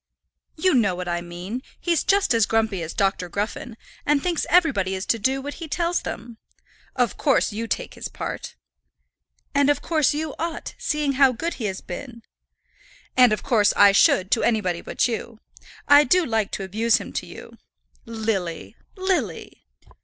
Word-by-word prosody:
"You 370 +3 +2
know 205 -8 +2
what 180 0 -5
I 175 0 -1
mean. 175 +8 -6 0.2
He's 340 -3 +1
just 400 -7 +2
as 225 -2 +3
grumpy 220 -4 0
as 165 0 -4
Dr. 195 -3 0
Gruffen, 215 +5 -4 0.3
and 295 0 +2
thinks 350 -3 -1
everybody 270 - +3
is 190 - -4
to 230 - +1
do 265 +5 0
what 290 +1 -5
he 325 - -5
tells 340 +2 0
them. 235 -1 -7 0.6
Of 245 -3 0
course, 275 -6 +2
you 225 +2 -4
take - - -3
his - - -6
part." - - -6 1.0
"And 285 0 +3
of 290 - +1
course 310 -5 +2
you 310 -1 -3
ought, 335 0 -4
seeing 300 -2 0
how 265 -2 +6
good 330 +8 -3
he - - -1
has 190 -2 -3
been." 235 +4 -8 0.9
"And 250 -3 +6
of 215 - -1
course 215 -5 +3
I 200 - +8
should, 190 -1 +4
to 230 - +3
anybody 185 -7 0
but - - 0
you. 230 -1 -5 0.5
I 290 +1 +8
do 360 +5 +3
like 225 -5 0
to - - -3
abuse 220 +4 +2
him - - -8
to - - -4
you." - - -12 0.5
"Lily, 215 -7 -3 0.2
Lily!" 335 - -3
230 Hz, 175 wpm, -23 LUFS, 200-290 Hz, 1.0 s, I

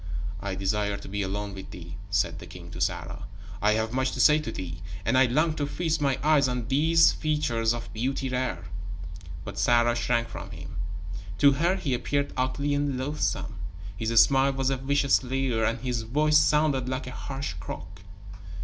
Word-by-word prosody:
"I 95 0 -3
desire 100 +1 0
to 100 - -10
be 100 +1 -2
alone 100 +1 -3
with 95 0 -8
thee," 85 -2 -9
said 100 -1 0
the - - -10
king - - -10
to - - -7
Sarah. - - -2 0.3
"I 105 +1 +4
have 110 +1 -1
much 130 0 0
to - - -5
say 150 0 +6
to 150 - -4
thee, 85 -2 -6 0.2
and 115 - +2
I 130 0 +6
long 155 +6 +2
to 145 - -1
feast 160 0 -1
my 140 -2 +2
eyes 150 -3 +4
on 125 -2 -2
those 160 +4 +5
features 120 -8 0
of 120 -3 -4
beauty 130 +4 -1
rare." 125 -9 -2 0.8
But - - -6
Sarah 120 0 +4
shrank 120 -1 +1
from - - -8
him. 75 - -8 0.6
To 140 0 +6
her, 170 +7 +2
he 140 -8 -2
appeared 140 +3 -1
ugly 140 +3 0
and 145 -2 0
loathsome. 140 -6 -2 0.4
His 110 +3 -2
smile 135 0 +5
was 135 0 0
a 135 - 0
vicious 140 +1 +2
leer, 130 -3 0
and 115 +2 0
his 125 -2 -1
voice 150 +7 +3
sounded 150 -4 +2
like 130 0 -2
a 125 - -6
harsh 135 -6 -5
croak. 90 +3 -8
130 Hz, 185 wpm, -27 LUFS, 110-140 Hz, 0.8 s, say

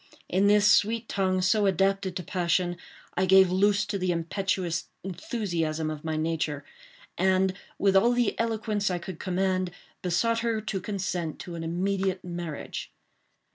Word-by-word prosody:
In 195 +3 +2
this 205 0 +5
sweet 220 +2 +4
tongue, 185 -2 0
so 205 +2 +3
adapted 195 0 +1
to 180 - -3
passion, 175 0 0 0.4
I 185 +1 +1
gave 190 -1 +6
loose 200 +2 +3
to 205 -1 -3
the 185 -1 +1
impetuous 170 0 -1
enthusiasm 170 -5 -2
of 150 -1 -7
my 160 -1 -2
nature, 155 -2 -2 0.5
and, 190 0 +3 0.2
with 195 -1 +2
all 235 +6 +5
the 240 -3 +2
eloquence 220 -2 0
I 180 - 0
could 175 -1 -7
command, 185 0 0 0.3
besought 230 +6 +1
her 230 -1 0
to 210 -3 -3
consent 180 -5 -3
to 175 - -8
an 165 -1 -5
immediate 190 +2 -1
marriage. 170 -4 -5
190 Hz, 150 wpm, -27 LUFS, 175-200 Hz, 0.5 s, gave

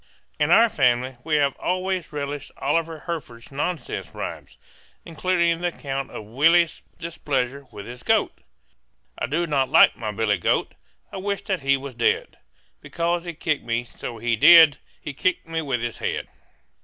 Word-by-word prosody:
In - - +2
our 230 - +7
family 125 - +1
we 155 -1 0
have 140 -2 +2
always 185 -1 -2
relished 145 -1 -5
Oliver 160 +2 -1
Herford's 135 -9 -7
nonsense 145 0 -4
rhymes, - - -7 0.5
including 170 0 0
the 175 - +1
account 135 -5 -4
of - - -8
Willie's 160 +9 +3 0.2
displeasure 140 -5 -3
with 100 - -9
his 125 +2 -9
goat: - - +1 0.8
"I - - -1
do 160 +7 0
not 140 -5 0
like - - +6
my 110 -3 -4
billy 105 -1 0
goat, - - 0 0.4
I - - -6
wish 200 +1 -3
that 190 -5 -2
he 135 0 +3
was 135 0 -8
dead; 115 0 0 0.4
Because 170 +1 -2
he 170 -2 -6
kicked 155 -2 -1
me, 115 +1 -1
so 120 0 -8
he 120 +1 0
did, 160 +3 +8 0.2
He 145 - -7
kicked 180 +4 -1
me 165 0 -2
with 130 -6 -2
his 120 -1 -4
head." - - -3
145 Hz, 165 wpm, -23 LUFS, 125-170 Hz, 0.8 s, did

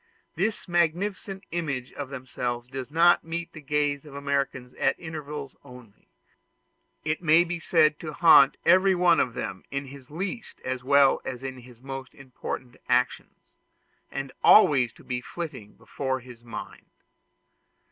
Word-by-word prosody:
This 205 +5 -2
magnificent 185 +3 -1
image 140 -7 -3
of 140 -2 -6
themselves 125 -2 -4
does 130 0 -6
not 170 +3 +4
meet 165 +1 -5
the 155 - -10
gaze 145 -1 0
of 150 -3 -13
the - - -7
Americans 140 -3 -2
at - - 0
intervals 150 -4 -7
only; 125 -5 -15 1.0
it 155 +1 -1
may 165 0 +5
be 175 0 -4
said 155 -2 +3
to 155 - -6
haunt 145 -3 +6
every 185 +2 +5
one 175 -1 +4
of 125 - 0
them 95 -3 -5
in 140 0 -3
his 135 -1 -12
least 195 - -5
as 130 -1 -3
well 140 0 +4
as 125 0 -6
in 130 -1 -5
his 120 -1 -16
most 135 -1 -7
important 130 -1 -7
actions, 125 +1 -1 0.6
and 135 0 -4
to - - -16
be - - -46
always 135 - +6 0.3
flitting 145 -13 -7
before 130 -1 -3
his 120 -2 -13
mind. 115 -1 -9
140 Hz, 150 wpm, -26 LUFS, 130-165 Hz, 1.0 s, haunt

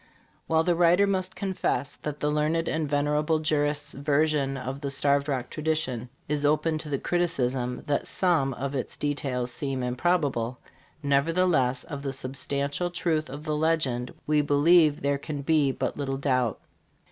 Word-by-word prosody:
While 160 0 +3
the 175 - +2
writer 175 +3 +4
must 185 -2 -1
confess 180 -8 -2
that 150 -1 -5
the 150 - +1
learned 155 +2 +1
and 155 -2 -1
venerable 150 +2 +1
jurist's 150 -2 0
version 140 -1 +1
of 130 +2 -5
the 140 - -2
Starved 140 +1 +2
Rock 130 -4 -2
tradition 150 -6 -2 0.2
is 145 0 -1
open 155 +2 +2
to 155 - -7
the 140 - 0
criticism 130 -8 -1
that 145 -2 -1
some 155 -8 +1
of 135 +3 -4
its 130 - -4
details 135 -4 -1
seem 135 -1 -3
improbable, 125 -3 0 0.5
nevertheless 140 -3 +2
of 145 -3 -7
the 135 -1 -3
substantial 140 +5 -1
truth 165 -3 -1
of 145 +3 -7
the 155 -1 -1
legend, 150 -6 0
we 150 0 +3
believe 150 +2 +4
there 140 0 +1
can 145 -1 -5
be 150 -2 +3
but - - -3
little 135 -2 -2
doubt. 130 -5 0
145 Hz, 160 wpm, -27 LUFS, 135-160 Hz, 0.5 s, writer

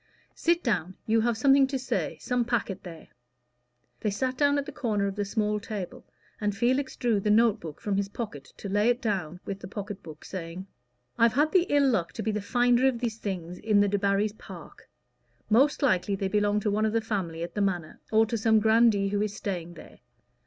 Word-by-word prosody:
Sit 340 +1 +1
down; 185 -6 -1
you 225 +1 +3
have 235 0 +1
something 275 +1 +5
to 270 0 -2
say 260 - -2
some 245 -1 0
packet 225 -5 -2
there." 170 -3 -11 0.9
They 210 - -1
sat 255 +6 -1
down 285 +1 +3
at 280 - -2
a - - -5
corner 210 -5 -1
of 195 -1 -2
the 205 0 -1
small 210 +1 0
table, 200 -3 -7 0.3
and 205 -1 -1
Felix 260 +4 +1
drew 235 -5 +1
the 210 - -1
note 225 0 +4
book 160 -6 -8
from 200 -2 -1
his 200 0 -1
pocket 200 - -6
to - - -7
lay 205 +3 +2
it 245 0 +2
down 185 -7 -3
with 195 0 -5
the - - -8
pocket 205 0 -6
book, 155 -2 -11
saying 180 0 -6 0.5
"I've 230 0 +5
had 300 +3 +2
the 370 -1 +3
ill 285 -1 +4
luck 185 -10 0
to - - -5
be 220 - 0
the 210 0 -2
finder 245 +4 +3
of 260 -3 +1
these 230 -2 -3
things 180 -4 -5
in 210 -2 +2
the 205 - +4
Debarrys' 200 +1 +1
park. - - -12 0.6
Most 275 +7 +4
likely 200 -5 +2
they 195 0 -2
belong 205 0 +2
to 210 - 0
one 215 +2 +1
of 215 - -2
the 230 - +2
family 185 -7 -3
at 170 - -6
the 205 - -1
Manor, 180 -5 -2
or 220 0 +5
to 230 0 -2
some 220 0 +4
grandee 220 -2 +4
who 205 0 0
is 210 -1 -2
staying 175 -4 -4
there. - - -14
210 Hz, 215 wpm, -27 LUFS, 195-235 Hz, 0.9 s, something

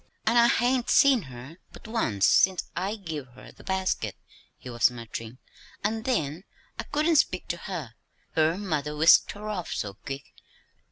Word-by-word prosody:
"An' 225 +2 +2
I 235 0 +6
hain't 245 +1 +1
seen 275 -4 +5
her 130 +6 -11
but - - -13
once 110 - 0
since 190 -1 +4
I 195 +4 -2
give 160 -10 -6
her - - -13
the - - -17
basket," 190 -1 -1 0.4
he - - -13
was 120 -1 +3
muttering; 115 0 -8 0.5
"an' 220 +2 -1
then 170 - -1 0.4
I - - -2
couldn't 310 +2 +2
speak 185 -9 +1
to 170 - -2
her 170 - -6 0.4
her 160 +2 +2
mother 150 -7 -2
whisked 160 +3 +5
her 210 +1 -8
off 195 -5 -4
so 100 -1 -3
quick. 135 +7 -8
175 Hz, 165 wpm, -27 LUFS, 140-220 Hz, 0.5 s, I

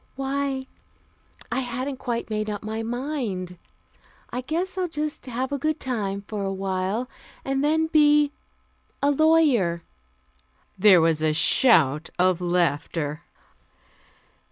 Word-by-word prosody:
"Why 270 0 -2 0.9
I - - 0
hadn't 255 +2 -3
quite 235 -3 -4
made 215 0 -1
up 205 -1 -5
my 220 +1 -3
mind. 230 - -4 0.7
I 250 - -3
guess 340 +8 -2
I'll 370 -1 -1
just 305 -2 -4
have 255 +2 -3
a 285 - -2
good 310 +2 -1
time 200 -6 -3
for 210 -2 -4
a 195 - -1
while, 195 +4 -2 0.4
and 270 +1 0
then 315 +2 +2
be 295 -2 +4 0.7
a 285 - +4
lawyer." 280 - +3 0.9
There 190 -2 +6
was 160 -1 +2
a 155 -1 +2
shout 155 - +3
of 180 0 +2
laughter. 165 -3 -1
235 Hz, 125 wpm, -24 LUFS, 185-280 Hz, 0.9 s, There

